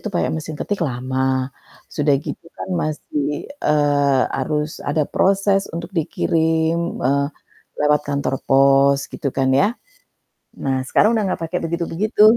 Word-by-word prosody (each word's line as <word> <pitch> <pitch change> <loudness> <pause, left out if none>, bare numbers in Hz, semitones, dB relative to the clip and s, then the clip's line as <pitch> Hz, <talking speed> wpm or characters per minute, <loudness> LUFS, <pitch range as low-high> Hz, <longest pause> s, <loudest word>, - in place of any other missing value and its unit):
itu 215 - -4
pakai - - +1
mesin 155 -1 -5
ketik 205 -2 -2
lama, 130 +1 -1 0.4
sudah 145 -2 +3
gitu - - -6
kan - - -5
masih, 150 -1 -3 0.4
eee, 145 -2 +3 0.2
harus 150 +3 -1 0.2
ada 150 +1 +2
proses 195 0 +2
untuk 170 0 -5
dikirim, 160 +1 0
eee, 140 +2 +1 0.5
lewat 150 0 +3
kantor 140 -1 -1
pos 135 +1 +5
gitu 140 - -2
kan 135 -1 +2
ya. 200 - +5 1.0
Nah, 135 -1 +1
sekarang 215 - +4
udah 215 - +1
ga - - -5
pake 165 +2 -2
begitu-begitu. 170 +6 0
150 Hz, 135 wpm, -20 LUFS, 140-170 Hz, 1.0 s, pos